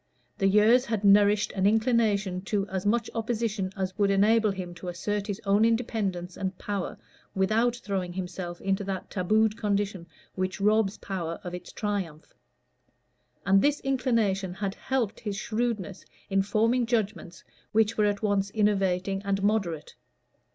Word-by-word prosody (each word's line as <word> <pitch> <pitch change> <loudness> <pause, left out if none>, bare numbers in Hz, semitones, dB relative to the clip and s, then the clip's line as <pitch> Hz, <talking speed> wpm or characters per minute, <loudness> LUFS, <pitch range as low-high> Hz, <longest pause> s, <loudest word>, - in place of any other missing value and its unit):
The 195 - +3
years 215 +6 +5
had 220 -5 -2
nourished 205 +1 +5
an 190 0 +1
inclination 215 -4 +2
to 200 -1 -1
as 190 +1 -2
much 230 +1 +1
opposition 225 -4 -2
as 190 -1 -2
would 200 -1 +3
enable 215 +3 +4
him 185 -3 -5
to 175 +1 -10
assert 200 +4 -3
his 205 0 -3
own 200 +2 +3
independence 215 -6 -1
and 190 -1 -4
power 200 -3 -4 0.4
without 220 +5 +2
throwing 195 -6 -3
himself 180 -1 -5
into 195 +1 0
that 190 -2 -5
tabooed 215 +3 +2
condition 200 -4 -1 0.3
which 185 +1 -3
robs 210 0 +2
power 170 -4 -4
of 180 -2 -6
its 180 - -8
triumph. 195 -8 -4 1.1
And 195 0 +5
this 290 0 +2
inclination 225 -9 0
had 195 -1 -3
helped 245 -4 -2
his 205 -2 -4
shrewdness 215 -4 -2 0.3
in 195 0 +3
forming 230 +4 +1
judgments 215 -6 -2 0.3
which 220 +1 +2
were 210 - +2
at 205 0 -1
once 200 -2 +1
innovating 195 -2 +1
and 195 -1 -1
moderate. 195 -7 0
200 Hz, 150 wpm, -27 LUFS, 190-220 Hz, 1.1 s, years